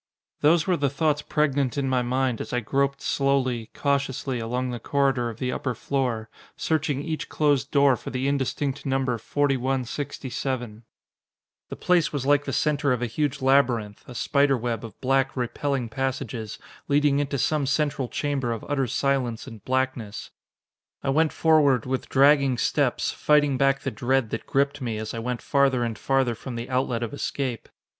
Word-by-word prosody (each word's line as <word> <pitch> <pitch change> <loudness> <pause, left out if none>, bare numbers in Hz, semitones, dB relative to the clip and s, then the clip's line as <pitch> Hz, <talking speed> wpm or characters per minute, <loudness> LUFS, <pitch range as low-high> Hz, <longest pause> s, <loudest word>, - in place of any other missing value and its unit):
Those 160 +2 +4
were 180 -2 +2
the 140 -1 +1
thoughts 150 +1 +1
pregnant 145 -4 0
in 140 -1 0
my 130 -1 +2
mind 125 -1 0
as - - -6
I 125 - +2
groped 140 +4 -1
slowly, 130 -5 0
cautiously 135 -2 -1
along 125 +3 -2
the 120 - -4
corridor 135 -2 +1
of 110 - -8
the 125 +1 -2
upper 125 -1 -2
floor, 125 -4 -2 0.3
searching 150 -3 0
each 160 0 -4
closed 145 -5 +1
door 140 -2 +4
for - - -8
the 130 +1 -2
indistinct 140 0 -1
number 135 -3 0
4167. 130 -3 -2 0.8
The - - -5
place 175 -3 +2
was 140 -3 -3
like 145 0 +3
the 135 - -3
center 145 0 +1
of 125 -1 0
a - - +2
huge 140 +3 -2
labyrinth, 120 -6 +2
a 125 - -10
spider 140 +1 +2
web 115 -1 -3
of 115 -4 -10
black, 135 0 +1
repelling 125 +1 -1
passages, 125 -3 -3 0.3
leading 145 0 +3
into 140 -1 -1
some 145 +2 +1
central 145 -2 0
chamber 135 -3 -2
of 115 - -4
utter 135 -3 0
silence 130 -2 0
and 115 -6 -11
blackness. 130 -5 -2 0.7
I 135 - +1
went 155 +2 +3
forward 145 -7 +3
with 130 0 -3
dragging 140 -1 +4
steps, - - +1
fighting 145 -2 +3
back 135 +1 +2
the - - -3
dread 120 +2 0
that 115 - -4
gripped 140 +1 +1
me 115 -4 -2
as 110 0 -5
I 115 - -4
went 120 +1 -3
farther 135 -3 +2
and 115 -2 -2
farther 130 +2 +1
from 120 +2 -7
the 120 +3 -5
outlet 125 -2 0
of 120 - -4
escape. 135 -4 -3
135 Hz, 170 wpm, -25 LUFS, 120-140 Hz, 0.8 s, Those